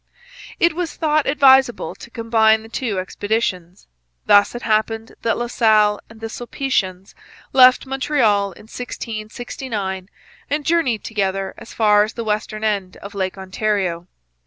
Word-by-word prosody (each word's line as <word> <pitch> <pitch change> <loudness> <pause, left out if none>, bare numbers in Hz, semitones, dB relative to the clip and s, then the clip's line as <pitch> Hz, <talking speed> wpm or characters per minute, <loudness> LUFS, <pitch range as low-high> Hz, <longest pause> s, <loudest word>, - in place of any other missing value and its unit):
It 340 -1 +3
was 350 0 -4
thought 310 -2 +1
advisable 265 -3 +4
to - - -13
combine 220 -1 +2
the 225 - -13
two 230 -4 -3
expeditions. 185 -2 -3 0.4
Thus 205 +3 +5
it 240 - -6
happened 220 0 0
that 230 -1 0
La 240 - -2
Salle 215 -3 +3
and 225 0 -15
the 225 - -3
Sulpicians 220 -6 -3 0.4
left 255 0 +6
Montreal 260 -7 +1
in - - -15
1669 215 -3 -6 0.4
and 290 0 -1
journeyed 320 -10 +1
together 195 -3 -2
as - - -12
far 210 -2 +4
as 215 - -4
the 230 - -4
western 215 0 -3
end 200 -4 -1
of 200 +1 -10
Lake 190 -1 -3
Ontario. 190 -3 -2
220 Hz, 140 wpm, -20 LUFS, 200-245 Hz, 0.4 s, left